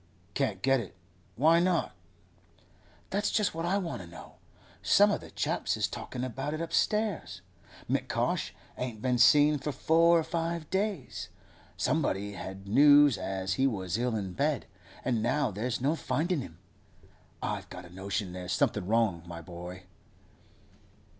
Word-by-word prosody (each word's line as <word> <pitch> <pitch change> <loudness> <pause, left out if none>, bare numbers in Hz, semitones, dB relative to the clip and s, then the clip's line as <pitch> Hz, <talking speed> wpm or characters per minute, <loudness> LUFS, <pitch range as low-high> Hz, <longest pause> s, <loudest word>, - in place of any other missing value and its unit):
'Can't - - -1
get 135 0 +4
it? 100 -8 -8 0.4
Why 160 +6 +5
not?' 175 -1 +1 1.2
'That's 205 +1 +1
just 210 -3 +1
what 165 +1 -3
I 195 +3 +2
want 175 - -3
to 90 - -10
know. 85 - -12 0.4
Some - - +5
o' - - 0
the - - -12
chaps - - -1
is - - +1
talkin' 125 - -6
about 135 +4 -3
it - - -5
upstairs. 170 - -1 0.4
M'Cosh - - -1 0.3
ain't 125 -4 -4
been 125 -2 +1
seen 145 +4 +6
for 150 +3 -3
four 165 +4 +4
or 165 - +1
five 165 0 -3
days. 190 - -2 0.5
Somebody 100 +2 0
had 95 +1 -8
news 145 +3 +7
as 95 -1 -2
he 135 - +5
was 95 -4 -2
ill 120 -1 0
in 95 -4 -3
bed, - - 0 0.4
and 120 -3 +1
now 130 +2 +1
there's 110 +5 -2
no 140 +6 +1
findin' 165 0 -1
him. 80 -9 -10 0.9
I've - - -3
got 90 0 -9
a 85 - -14
notion 95 0 -3
there's 90 0 -4
something 100 -4 +1
wrong, 110 -6 +2
my 85 -1 -7
boy. 90 +2 -9
125 Hz, 155 wpm, -30 LUFS, 95-160 Hz, 1.2 s, news